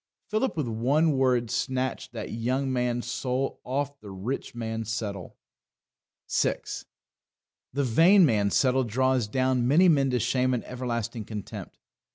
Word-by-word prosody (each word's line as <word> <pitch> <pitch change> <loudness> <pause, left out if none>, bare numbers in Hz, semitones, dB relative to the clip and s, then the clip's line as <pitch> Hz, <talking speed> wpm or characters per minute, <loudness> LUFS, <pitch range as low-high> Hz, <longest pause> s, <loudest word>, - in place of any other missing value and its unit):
Philip 215 -2 0
with 150 -5 -1
one 135 +8 +2
word 125 -4 +1
snatched 130 +1 -2
that - - -5
young 130 +4 -1
man's 120 -1 -1
soul 130 +2 -2
off 140 +2 -3
The 105 - -11
Rich 100 +8 -5
Man's 115 -1 -4
Settle. 100 -7 -5 0.9
6. - - -1 0.9
The 140 +2 0
Vain 170 - +6
Man's 105 -7 +2
Settle 130 0 +3
draws 130 0 +1
down 130 +1 +1
many 165 +8 +5
men 140 -4 +3
to 125 -1 +1
shame 130 +3 +1
and 120 - -4
everlasting 120 -3 -4
contempt. 105 -3 -7
125 Hz, 140 wpm, -27 LUFS, 115-135 Hz, 0.9 s, Vain